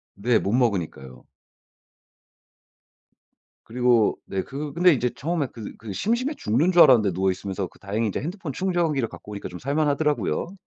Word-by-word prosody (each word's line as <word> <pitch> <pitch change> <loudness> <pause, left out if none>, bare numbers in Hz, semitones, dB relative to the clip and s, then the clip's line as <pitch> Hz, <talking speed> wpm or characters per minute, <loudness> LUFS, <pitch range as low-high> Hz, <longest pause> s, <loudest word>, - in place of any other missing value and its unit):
네. 115 +4 +2
못 100 - -2
먹으니까요. 90 - -1 2.4
그리고 120 -2 +2
네 95 -1 -2
그 140 +1 -6
근데 175 +1 +5
이제 125 -2 0
처음에 155 -1 -1
그 110 -3 -8
그 105 -2 -8
심심해 235 - 0
죽는 135 +12 +1
줄 175 -2 +6
알았는데 110 -7 +6
누워 95 +2 +1
있으면서 95 0 -4
그 - - -23
다행히 105 +3 -2
이제 100 - -2
핸드폰 170 0 -5
충전기를 170 -7 0
갖고 105 - -12
오니까 100 - -6
좀 90 - -9
살 140 +3 -3
만하더라고요. 150 +4 0
125 Hz, 355 characters per minute, -24 LUFS, 100-155 Hz, 2.4 s, 줄